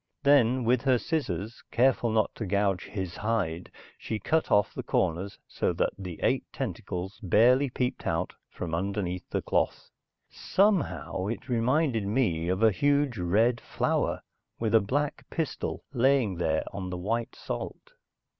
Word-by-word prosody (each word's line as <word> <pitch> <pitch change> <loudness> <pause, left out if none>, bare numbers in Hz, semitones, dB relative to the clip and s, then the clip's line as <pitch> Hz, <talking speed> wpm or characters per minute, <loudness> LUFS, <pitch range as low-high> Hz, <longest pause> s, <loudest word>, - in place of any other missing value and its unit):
Then 130 -3 +4
with 120 +1 +3
her 130 -2 +3
scissors, 115 - -3
careful 120 -1 +3
not 110 -1 +1
to 110 - -5
gouge 100 -1 +1
his 95 -4 -5
hide, 95 -6 -1 0.3
she 110 - -3
cut 160 +10 0
off 105 -1 +3
the - - -4
corners 95 +3 -1
so - - -1
that - - 0
the 90 -4 -7
eight - - +2
tentacles 90 +3 -5
barely 120 +8 +4
peeped 125 +1 -2
out 80 +3 -1 0.2
from 85 -2 -6
underneath 90 0 -2
the - - -2
cloth. - - -1 0.4
Somehow, 195 - 0
it 115 +3 -4
reminded 125 -2 +1
me 100 -8 +1
of 95 +4 0
a 110 - +7
huge 140 0 +1
red 110 +7 +2
flower - - -1 0.3
with 110 -2 -1
a 110 - +7
black 145 +8 -1
pistil 160 -3 -3
laying 130 -4 +3
there 80 -2 +1
on 95 -1 -4
the 90 - -4
white 115 +6 -2
salt. - - -6
110 Hz, 150 wpm, -28 LUFS, 95-125 Hz, 0.4 s, a